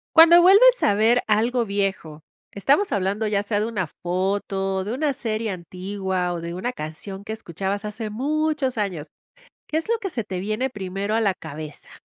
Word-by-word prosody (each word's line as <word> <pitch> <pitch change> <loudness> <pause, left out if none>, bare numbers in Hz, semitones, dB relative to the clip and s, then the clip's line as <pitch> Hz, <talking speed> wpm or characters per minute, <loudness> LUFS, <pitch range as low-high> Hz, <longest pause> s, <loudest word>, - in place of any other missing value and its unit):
Cuando 335 +2 +9
vuelves 475 +7 +7
a 205 - +4
ver 225 +4 +3
algo 230 +3 +2
viejo, 195 -6 -2 0.3
estamos 280 - +2
hablando 200 +3 0
ya 205 -1 +1
sea 205 0 -1
de 210 - 0
una 205 -6 -2
foto, 190 +2 -2
de 210 +4 -4
una 290 +3 0
serie 225 -3 -2
antigua, 185 0 -3
o 170 - -4
de 170 +1 -5
una 185 +8 -3
canción 190 +1 -7
que 220 - -5
escuchabas 195 0 -4
hace 210 0 -5
muchos 290 +1 -1
años. 180 -7 -2 0.6
¿Qué 310 - -2
es 325 +7 -1
lo 465 - +2
que 400 - -4
se 240 - -3
te 185 -2 -4
viene 215 +7 -1
primero 195 -1 -3
a 225 - +2
la 200 -4 +2
cabeza? 155 -4 -8
205 Hz, 185 wpm, -23 LUFS, 190-245 Hz, 0.6 s, Cuando